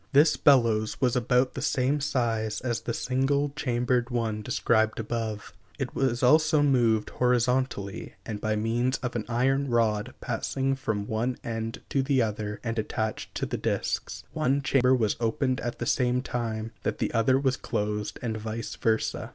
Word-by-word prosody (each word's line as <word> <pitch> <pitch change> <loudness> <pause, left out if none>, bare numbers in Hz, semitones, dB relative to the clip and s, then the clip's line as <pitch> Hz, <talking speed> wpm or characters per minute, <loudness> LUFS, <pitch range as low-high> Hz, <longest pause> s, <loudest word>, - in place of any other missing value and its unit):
This 150 +3 +6
bellows 115 -6 +3
was 125 -2 +2
about 125 +1 +2
the - - -5
same 135 +3 +1
size 115 -5 0
as 120 -3 -2
the 115 - -3
single 140 +2 0
chambered 120 -1 0
one 115 -3 -1
described 110 +1 +1
above. 110 -1 -4 0.2
It 135 -4 -3
was 130 -2 0
also 155 +3 +5
moved 120 -6 +2
horizontally, 125 -4 0
and 105 -3 -5
by 110 0 0
means 120 +4 0
of 125 -1 -3
an 115 - -2
iron 135 +3 +1
rod 110 -3 +1
passing 135 0 -1
from 110 -6 -2
one 115 +4 -1
end 115 0 -4
to 135 - +1
the 135 0 +1
other 105 -2 -2
and 115 -1 -2
attached 110 0 -3
to - - -1
the - - -3
disks, - - -2
one 140 +2 +1
chamber 130 -2 +4
was 110 -4 +1
opened 125 +3 0
at 120 - -3
the 120 - -3
same 125 +1 +1
time 115 -3 -3
that - - -2
the - - -2
other 120 +3 +3
was 135 -2 +1
closed, 105 -2 -3
and 115 -2 -2
vice 110 +1 -5
versa. 110 -1 0
120 Hz, 170 wpm, -27 LUFS, 110-130 Hz, 0.2 s, This